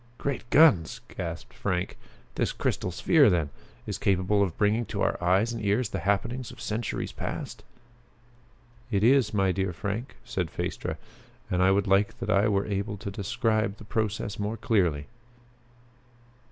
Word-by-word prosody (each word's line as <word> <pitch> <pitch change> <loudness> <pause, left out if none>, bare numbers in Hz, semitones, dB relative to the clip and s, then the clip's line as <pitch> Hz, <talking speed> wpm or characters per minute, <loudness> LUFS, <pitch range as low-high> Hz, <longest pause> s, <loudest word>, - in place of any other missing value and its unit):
"Great 135 -3 -3
guns!" 115 - +5 0.2
gasped 85 -2 -5
Frank. 90 -2 -2 0.4
"This - - 0
crystal - - -1
sphere 140 - +4
then, 85 -6 +1 0.3
is - - -4
capable 100 +2 +2
of 95 -5 0
bringing 105 +3 +2
to - - -2
our - - +2
eyes 95 +7 +3
and 115 - -5
ears 105 +3 +1
the 95 - -3
happenings 110 +7 -1
of - - -12
centuries 110 0 -3
past?" - - -6 1.3
"It 100 -3 +1
is, 130 0 +5
my 95 -3 +2
dear 95 -1 -1
Frank," 105 +8 -4
said 90 -4 -2
Phaestra, - - -4 0.5
"and 90 0 +2
I 95 - +5
would 100 +1 +3
that 100 +1 +1
I 100 +1 +4
were 100 -2 +1
able 100 +1 -2
to 100 - -6
describe 110 +1 0
the - - -11
process 105 -2 -2
more 105 +2 -2
clearly." 90 - +1
100 Hz, 155 wpm, -27 LUFS, 95-110 Hz, 1.3 s, guns